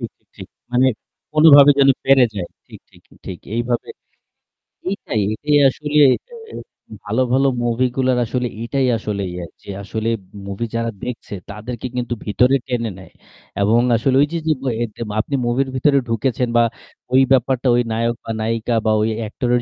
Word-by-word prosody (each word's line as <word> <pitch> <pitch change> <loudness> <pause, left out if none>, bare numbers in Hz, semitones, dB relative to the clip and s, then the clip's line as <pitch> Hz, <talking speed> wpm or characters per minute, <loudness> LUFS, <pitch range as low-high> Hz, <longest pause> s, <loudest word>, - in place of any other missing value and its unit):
ঠিক, - - -5
ঠিক, - - -43
ঠিক। - - -10 0.2
মানে 125 +2 +4 0.5
কোনভাবে 145 -2 +8
যেন 135 0 +5 0.2
পেরে 135 -2 +6
যায়। 90 -4 -4 0.2
ঠিক, - - -13
ঠিক, - - -21 0.2
ঠিক 90 -2 -6 0.2
এইভাবে 120 +1 -2 1.0
এইটাই, 190 - -3
এটাই 145 +6 +1
আসলে 150 +2 -3 0.2
এটা 485 - -15 0.7
ভালো, 110 +5 0
ভালো 135 +1 +3 0.2
মুভিগুলার 125 +2 +1
আসলে 125 +2 -2
এইটাই 130 +2 0
আসলে 105 -2 -4
ইয়া 90 -1 -6 0.2
যে - - -13
আসলে 110 +3 -3 0.4
মুভি 100 +4 -3
যারা 115 0 -1
দেখছে, 125 -4 -6 0.2
তাদেরকে 115 +4 -6
কিন্তু 120 -1 -2
ভিতরে 125 +6 +3
টেনে 120 -3 -2
নেয় 95 - -14 0.5
এবং 110 +4 +3 0.2
আসলে 130 +3 +1
ওই 145 - +3
যে, 170 - 0
যে 155 - +3
ব - - -11 0.2
এর 120 - 0
যে - - -9 0.2
আপনি 140 +6 -1
মুভির 130 +3 0
ভিতরে 140 +2 +3
ঢুকেছেন 125 +2 0
বা 120 - +5 0.5
ওই 130 - +6
ব্যাপারটা, 130 0 +2
ওই 120 - +3
নায়ক 115 +1 0
বা 115 - -4
নায়িকা, 115 +1 -1
বা 110 - +3
ওই 110 - +1
অ্যাক্টরের 120 +3 -1
120 Hz, 170 wpm, -19 LUFS, 115-135 Hz, 1.0 s, কোনভাবে